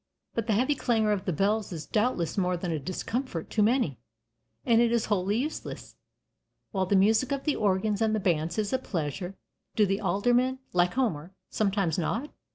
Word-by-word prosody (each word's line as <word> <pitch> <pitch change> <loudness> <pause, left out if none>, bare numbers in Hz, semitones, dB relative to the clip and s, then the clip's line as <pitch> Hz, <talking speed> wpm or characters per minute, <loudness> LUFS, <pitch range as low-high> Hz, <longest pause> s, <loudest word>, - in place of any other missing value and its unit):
But 230 -2 -2
the 220 - +2
heavy 255 +8 +2
clangor 225 -6 +1
of 200 -2 -1
the 185 - 0
bells 200 +5 0
is 160 -4 -5
doubtless 210 - 0
more 180 -2 +1
than 175 0 -3
a 160 - -1
discomfort 185 - -4
to 215 - +1
many, 210 - +2 0.7
and 235 -2 +5
it 235 -1 +3
is 235 -2 +1
wholly 200 +2 0
useless, 295 +6 -5 0.8
while 190 -3 0
the 200 - +2
music 220 +7 +3
of 275 -1 -1
the 300 - +1
organs 205 +1 +1
and 220 -1 +2
the - - 0
bands 170 -3 0
is 210 0 -1
a 260 - +2
pleasure. 175 - -4 0.4
Do 210 - +4
the 195 +1 -1
Aldermen, 245 +6 +2 0.2
like 180 +1 +2
Homer, 190 - -1 0.2
sometimes 195 -5 0
nod? 230 - -2
205 Hz, 185 wpm, -28 LUFS, 180-235 Hz, 0.8 s, and